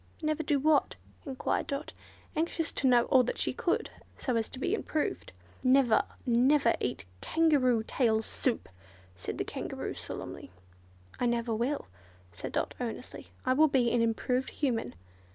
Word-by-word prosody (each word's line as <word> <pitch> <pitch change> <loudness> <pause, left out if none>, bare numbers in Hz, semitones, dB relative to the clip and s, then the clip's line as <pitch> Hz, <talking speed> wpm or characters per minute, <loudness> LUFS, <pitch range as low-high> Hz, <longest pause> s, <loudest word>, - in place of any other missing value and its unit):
"Never 310 0 0
do 290 -2 +1
what?" 295 +1 +3 0.3
enquired 265 -1 -1
Dot, 285 0 -4 0.4
anxious 330 +1 0
to 270 - 0
know 245 -2 +6
all 260 - +5
that 250 - -2
she - - +1
should - - 0
do, - - -21
so 250 - -1
as 225 -1 0
to - - -8
be 270 - -1
improved. 315 -8 -2 0.3
"Never, 255 -3 +5 0.2
never 250 +1 +4
eat 125 - -3 0.2
Kangaroo 275 -8 +3
tail 225 -4 +2
soup!" 245 +2 -1 0.5
said 90 - -5
the - - 0
Kangaroo, - - -4
solemnly. - - -7 0.7
"I 245 - +2
never 235 -1 0
will," 245 +7 -1 0.5
said 85 - -6
Dot, - - -1
earnestly, - - -6 0.2
"I 255 - +3
will 310 +4 +5
be 250 -5 +2
an 240 - +2
improved 250 +3 0
Human." 235 - -1
255 Hz, 155 wpm, -30 LUFS, 235-290 Hz, 0.7 s, know